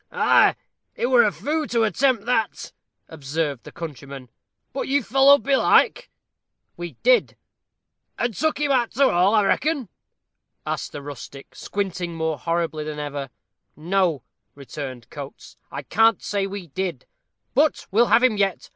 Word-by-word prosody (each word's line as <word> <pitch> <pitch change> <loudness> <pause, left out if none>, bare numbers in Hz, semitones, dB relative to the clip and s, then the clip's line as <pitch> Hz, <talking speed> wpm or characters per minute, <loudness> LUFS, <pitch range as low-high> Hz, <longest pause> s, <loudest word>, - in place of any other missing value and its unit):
"Ah, - - +4 0.4
he - - -1
were 250 -1 +5
a 215 -3 +3
foo' 305 +5 -2
to 230 -1 +1
attempt 230 +1 +1
that," 225 -4 -1 0.3
observed 145 -3 -3
the - - -11
countryman; 140 -5 -9 0.4
"but 270 - -3
you 280 0 +1
followed 270 +5 +5
belike?" 445 - +3 0.7
"We 175 -1 -7
did." - - +3 0.8
"And 240 -1 -1
took 315 - -1
him 295 -1 +1
arter 255 0 +1
all, 185 +5 +3
I 210 - +4
reckon?" 280 - 0 0.8
asked - - -3
the 145 - -8
rustic, 140 -1 -10
squinting 185 -4 -4
more 160 -3 -2
horribly 165 0 -2
than 150 0 -6
ever. 145 -2 -5 0.5
"No," 170 -2 0 0.3
returned 135 -3 -8
Coates, - - -10
"I - - -6
can't 225 -2 +3
say 200 -1 -1
we 195 -2 -7
did; 180 +3 -4 0.5
but 295 +3 +2
we'll 230 +5 +4
have 240 - +4
him 245 -5 +3
yet. 195 -2 -1
195 Hz, 145 wpm, -23 LUFS, 155-250 Hz, 0.8 s, were